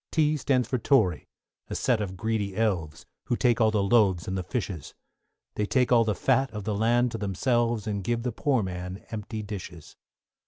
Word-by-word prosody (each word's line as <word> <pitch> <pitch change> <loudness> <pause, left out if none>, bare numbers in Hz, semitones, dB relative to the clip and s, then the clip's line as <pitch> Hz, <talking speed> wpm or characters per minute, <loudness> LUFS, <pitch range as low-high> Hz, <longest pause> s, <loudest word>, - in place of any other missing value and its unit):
=T= 155 -1 +2
stands 130 -4 +1
for 130 0 -1
Tory, 110 - +2 0.4
a - - -5
set 120 -4 +1
of 95 -2 -4
greedy 105 -1 -2
elves, 90 -9 -1 0.2
Who 120 - 0
take 120 -1 +2
all 110 - +5
the 105 -2 +1
loaves 100 -5 +3
and 95 - -2
the 95 - -1
fishes; 90 - -5 0.6
They 105 - -1
take 125 +1 +2
all 120 -2 +6
the 105 -2 0
fat 135 0 +2
of 105 -2 -6
the 105 +1 -2
land 120 +3 +2
to 115 - -5
themselves, 115 +2 0
And 100 -2 -2
give 115 +3 -1
the 125 - -1
poor 130 0 +1
man 90 +1 -6
empty 110 0 -5
dishes. 90 -6 -8
110 Hz, 195 wpm, -27 LUFS, 95-120 Hz, 0.6 s, all